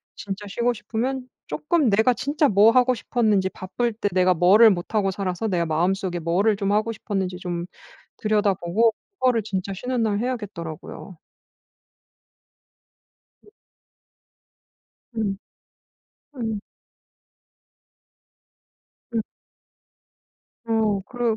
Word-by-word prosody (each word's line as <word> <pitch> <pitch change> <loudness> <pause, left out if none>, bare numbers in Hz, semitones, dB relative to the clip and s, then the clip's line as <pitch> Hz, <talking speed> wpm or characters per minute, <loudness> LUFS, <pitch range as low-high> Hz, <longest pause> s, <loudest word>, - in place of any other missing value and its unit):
진짜 200 0 -6
쉬고 240 +4 0
싶으면 250 +5 -3 0.2
쪼끔 305 -5 +1
내가 220 +5 +4
진짜 290 +1 +1
뭐 210 +3 +6
하고 255 0 +4
싶었는지, 210 -4 +1
바쁠 230 +6 -3
때 210 -2 -2
내가 185 0 +4
뭐를 205 +6 +7
못 180 +4 -4
하고 195 -2 +2
살아서 190 +2 -2
내가 175 -4 0
마음속에 180 +3 0
뭐를 190 +6 +2
좀 200 -1 -1
하고 215 +2 +1
싶었는지 190 -4 -3
좀 175 -1 -4 0.5
들여다보고 210 0 +2 0.3
그거를 245 -4 +2
진짜 195 -2 -3
쉬는 250 +3 -2
날 205 -2 +1
해야겠더라고요. 195 -7 -6 2.3
음. 420 - -21 1.6
음. 200 -3 -1 1.0
음. 220 -4 -3 2.5
음. 225 - +1 1.4
어. 220 -3 +1
그르 240 -3 0
210 Hz, 215 characters per minute, -23 LUFS, 190-230 Hz, 2.5 s, 뭐를